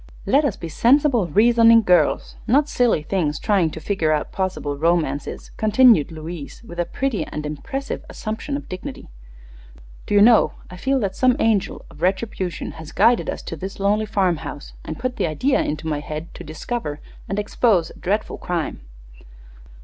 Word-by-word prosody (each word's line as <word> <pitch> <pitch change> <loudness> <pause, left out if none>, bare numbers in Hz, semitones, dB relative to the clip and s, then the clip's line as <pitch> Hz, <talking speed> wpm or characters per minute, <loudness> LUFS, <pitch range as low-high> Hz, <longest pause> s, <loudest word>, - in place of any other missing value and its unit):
"Let 290 +3 +3
us 250 - 0
be 165 - -6
sensible, 245 - +3
reasoning 230 +5 +5
girls; 180 -3 +2
not 280 +5 +3
silly 245 - +1
things 155 -3 -1
trying 195 -6 +2
to 160 - -8
figure 160 -2 0
out 150 -1 -1
possible 185 -7 -2
romances," 155 -2 -1
continued 215 - +5
Louise, 160 +3 -8
with 175 -7 -10
a 175 - +1
pretty 265 -2 -2
and 150 0 -5
impressive 270 - -5
assumption 220 +6 -4
of - - -9
dignity. 185 - -8 1.0
"Do 205 - 0
you 205 - +6
know, 230 0 +5 0.2
I - - -8
feel 265 +7 +1
that 195 -2 -2
some 255 -1 +3
angel 220 -7 0
of 150 - -15
retribution 185 -1 -2
has 160 - -10
guided 235 0 +3
us - - -4
to - - -6
this 190 +6 -7
lonely 210 +2 +1
farmhouse 170 -8 -2
and 155 - -6
put 255 0 -3
the - - +1
idea 255 - +1
into 155 +1 -3
my 150 -2 -1
head 155 +2 -7
to - - -9
discover 155 0 -5 0.3
and 195 - -2
expose 205 -4 +1
a - - -15
dreadful 210 +4 -2
crime." 170 - -3
190 Hz, 170 wpm, -22 LUFS, 160-230 Hz, 1.0 s, you